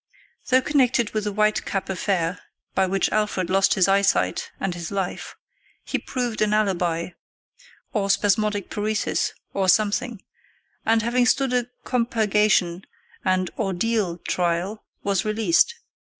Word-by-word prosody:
Though 260 -1 +4
connected 250 -6 +2
with 215 -1 -2
the 210 - -1
White 215 +1 +1
Cap 195 -2 -3
affair 185 -2 -1 0.3
by 190 0 +2
which 185 -1 0
Alfred 210 -4 0
lost 195 0 +3
his 190 -2 +3
eyesight 195 - +2
and 195 -2 -1
his 170 -1 -6
life, 195 -3 -4 0.5
he - - -2
proved 245 -4 -3
an 210 0 +3
alibi, 175 -5 0 0.8
or 200 -4 0
spasmodic 205 0 +1
paresis, 210 0 -1 0.2
or 190 -1 +1
something, 215 +3 +1 0.6
and, 225 0 +3
having 245 +2 +2
stood 265 0 +2
a 245 -1 +1 0.2
compurgation 210 -7 +1 0.4
and 185 -1 +1
"ordeal" 200 -2 0
trial, 180 +4 -2 0.2
was 200 -2 +1
released. 215 - +2
205 Hz, 130 wpm, -23 LUFS, 185-220 Hz, 0.8 s, Though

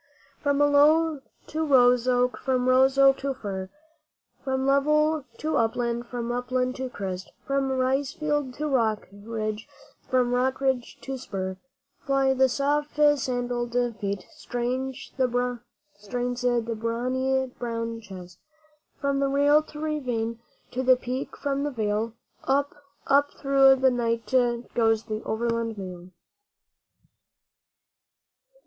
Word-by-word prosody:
From 285 -1 +1
aloe 295 +1 +4 0.2
to 315 +1 -2
rose 250 -4 +4
oak, 250 0 +2
from 255 -1 0
rose 265 +1 +4
oak 270 0 +6
to 275 -1 -2
fir, 190 -5 -5 0.7
From 265 -1 -1
level 300 +2 +2
to 310 +1 -1
upland, 235 +1 0
from 240 -1 -4
upland 250 +1 -1
to 260 0 -3
crest, 190 -5 -5
From 275 0 0
rice 265 +1 +1
field 295 -4 -2
to 300 - -2
rock 225 -6 +1
ridge, 215 +1 -5 0.4
from 250 -1 +2
rock 255 +1 +1
ridge 265 -3 -1
to 270 -1 -5
spur, 190 -5 -4 0.4
Fly 270 -1 +2
the 265 0 +3
soft 290 +3 0
sandalled 245 -5 +1 0.2
feet, 200 -2 -3
strains 260 -2 -4
the 260 -1 +3 1.5
brawny 255 +3 0
brown 230 -1 -3
chest. 185 -4 -11 0.6
From 280 0 0
rail 285 +2 +4
to 305 -1 -11
ravine 250 -7 -2 0.3
to 255 - -2
the 255 0 +5
peak 250 +1 -5
from 280 -1 -1
the 295 - 0
vale 220 -2 -2 0.3
Up, 280 +1 +1 0.3
up 285 +1 +3
through 275 -1 +5
the 265 0 +3
night 230 -1 -2 0.4
goes 225 -2 +2
the 215 -1 -4
Overland 230 0 -1
Mail. 180 -2 -8
255 Hz, 120 wpm, -26 LUFS, 230-275 Hz, 1.5 s, oak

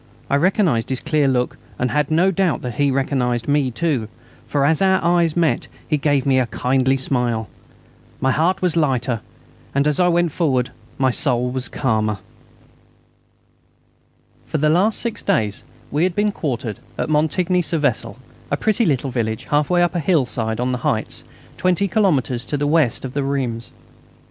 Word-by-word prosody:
I - - +4
recognised 160 - +2
his 130 -1 -1
clear 150 -3 +1
look, 125 -2 0 0.2
and 125 0 -1
had 150 -1 +1
no 170 +5 +3
doubt 185 -4 0
that 125 -2 -4
he 145 +4 +1
recognised 130 -3 0
me 145 -2 +2
too, 130 -4 -1 0.4
for 140 -1 +1
as 160 +3 +2
our 190 -1 +4
eyes 170 -1 +2
met 165 -2 +1 0.2
he 155 - +1
gave 145 -2 +1
me 135 -1 +3
a 125 - +1
kindly 130 +3 +1
smile. 125 -4 -1 0.7
My 130 - +2
heart 170 +7 +1
was 175 -3 +2
lighter 130 -7 0 0.5
as 145 +2 +2
I 180 - +4
went 175 -1 +2
forward, 130 -7 0
and 125 - -24 0.2
my 130 -1 +2
soul 125 -1 0
was 130 0 -3
calmer. 110 -5 0 2.3
For - - -1
the 150 +1 +2
last 190 +7 +2
six 235 -2 -2
days 105 -2 0 0.3
we 150 - 0
had 180 -1 0
been 210 0 +2
quartered 125 - -3 0.2
at - - -1
Montigny 165 +4 +1
sur 170 -1 -1
Vesle, 145 -2 -1 0.3
a - - 0
pretty 220 +1 +1
little 135 -3 0
village 115 -1 -2
half 145 0 +2
way 175 -1 +3
up 175 - +1
a 175 - 0
hillside 125 - 0
on 125 +1 0
the 125 - -2
heights, 135 -7 -2 0.3
20 185 +2 +1
kilometres 150 - +1
to 145 - -2
the 145 - -1
west 145 -5 +2
of 130 +1 -7
Reims. 135 -5 -2
140 Hz, 175 wpm, -20 LUFS, 125-170 Hz, 2.3 s, I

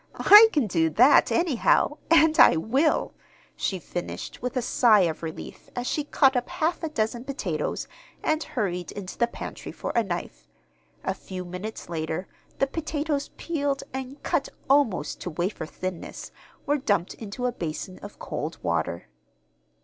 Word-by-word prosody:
"I 420 +2 +9
can 290 -6 +2
do 165 -5 +1
that, 250 - +5
anyhow; 310 -2 +2
and 320 -1 +5
I - - +8
will," 265 - +1 0.4
she 190 - -1
finished, 175 0 -6
with 250 +2 -3
a - - +2
sigh 225 -3 +5
of 165 -3 0
relief, 160 -1 -8
as 245 0 -3
she 295 +3 -1
caught 270 -2 +3
up 245 0 -1
half 330 +2 -1
a 325 - -2
dozen 235 -3 -2
potatoes 275 +1 -3 0.4
and 310 0 +1
hurried 180 - -3
into 190 -2 -7
the 235 - +2
pantry - - -7
for - - -5
a 235 - +2
knife. 175 - -5 0.6
A - - -1
few 185 -1 -8
minutes 180 +5 -7
later, 160 +2 -3 0.3
the - - +3
potatoes, 295 -1 -2
peeled, 285 -4 -2
and 265 +1 -6
cut - - 0 0.2
almost 235 - +2
to - - -4
wafer 175 0 -3
thinness, 185 +1 -6 0.3
were 290 +1 +1
dumped 205 -9 0
into 225 +3 -6
a 250 - +1
basin 180 -2 -5
of 205 - -10
cold 155 +3 -5
water. 85 -1 -1
230 Hz, 155 wpm, -26 LUFS, 180-285 Hz, 0.6 s, I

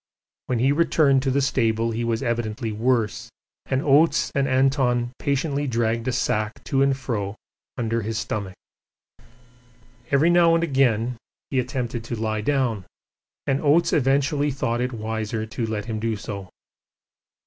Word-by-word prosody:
When 125 - 0
he 130 +4 +3
returned 145 -3 +3
to 135 - -1
the 140 +1 +1
stable 115 -3 +1
he 115 +1 -2
was 115 +1 -1
evidently 115 -2 -2
worse, 120 +1 0 0.4
and 130 +1 0
Oates 140 -5 +3
and 140 -1 +1
Anton 130 -2 +2
patiently 140 0 -1
dragged 115 -1 0
a - - +2
sack 110 -3 -1
to 135 - 0
and 135 -1 +3
fro 105 -7 -3 0.4
under 115 -1 -1
his 110 +1 -3
stomach. 100 -4 -4 1.5
Every 145 +5 +4
now 170 -1 +5
and 165 - +1
again 125 -5 +1 0.3
he 135 - +1
attempted 125 -2 -3
to 120 - -4
lie 110 -1 -2
down, 120 -5 0 0.6
and 135 0 0
Oates 155 +3 +3
eventually 140 +2 +2
thought 120 -3 -1
it 125 +1 -1
wiser 110 -1 -3
to 115 +1 -4
let 105 -2 -3
him 110 -2 -3
do 115 0 -1
so. 100 -3 -7
120 Hz, 150 wpm, -23 LUFS, 110-135 Hz, 1.5 s, now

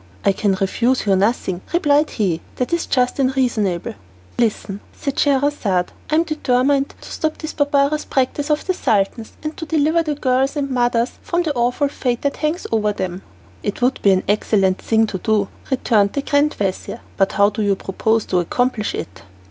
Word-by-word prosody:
"I - - +5
can 195 0 +1
refuse 230 +7 0
you 195 -2 +3
nothing," 190 -2 0
replied 300 -3 +3
he, 180 -6 -1
"that 250 +6 -2
is 340 - 0
just 250 +1 +1
and 265 0 +1
reasonable." 210 -9 0
"Then - - -14 0.4
listen," 205 -3 0
said 280 -2 -4
Scheherazade. 270 -10 +1 0.2
"I 305 - +2
am 325 - +4
determined 275 -3 +1
to - - -11
stop 315 0 -2
this 310 - -6
barbarous 285 0 +1
practice 280 +3 -1
of 300 0 +1
the 370 - +1
Sultan's, 220 - 0
and 305 0 -4
to 320 - -6
deliver 315 +1 +2
the 305 -2 -2
girls 265 0 +1
and 280 -2 -2
mothers 240 -1 0
from 345 0 0
the 310 -3 -1
awful 245 +3 +1
fate 250 -3 -2
that 280 - -1
hangs 310 +4 -1
over 215 -2 +2
them." 185 -2 -4 0.4
"It 205 +4 -3
would 255 +2 +1
be 200 - +4
an 190 -1 +3
excellent 195 -2 +2
thing 225 0 +2
to 195 -3 -4
do," 210 0 +1 0.2
returned 220 -6 +2
the 280 - -2
grand 290 +2 +2
vizir, 190 -2 -3
"but 195 - +1
how 200 +1 +4
do 215 +1 -3
you 200 -1 +2
propose 220 +4 0
to 180 - +1
accomplish 220 +4 -1
it?" - - -7
245 Hz, 190 wpm, -20 LUFS, 205-285 Hz, 0.4 s, I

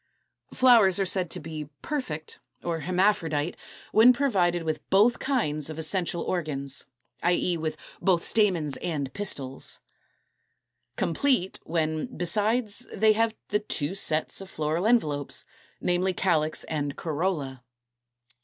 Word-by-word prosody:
Flowers 230 -7 +5
are 195 - +2
said 185 -2 +1
to - - -5
be 155 -1 -7
Perfect 160 - -4 0.2
(hermaphrodite), 170 -2 0 0.4
when 235 +3 +7
provided 185 -11 +1
with 155 -2 -2
both 215 +5 +4
kinds 155 - 0
of 155 - -6
essential 170 +1 -1
organs, 145 -6 -1 0.3
i. 175 - +3
e. 175 0 +1
with 160 -1 -3 0.2
both 180 -3 +2
stamens 175 -10 +1
and 145 -6 -3
pistils. 135 -10 -2 1.2
Complete, 190 - 0
when, 160 -1 -1
besides, 210 +6 0
they 215 +1 +4
have 225 +1 +1
the 210 - +2
two 165 -6 -2
sets 160 -3 0
of 190 - -9
floral 155 +5 -1
envelopes, 150 - +1 0.3
namely, 180 +1 +1
calyx 160 -5 +1
and 145 -3 -3
corolla. 150 -6 -2
175 Hz, 120 wpm, -27 LUFS, 155-205 Hz, 1.2 s, when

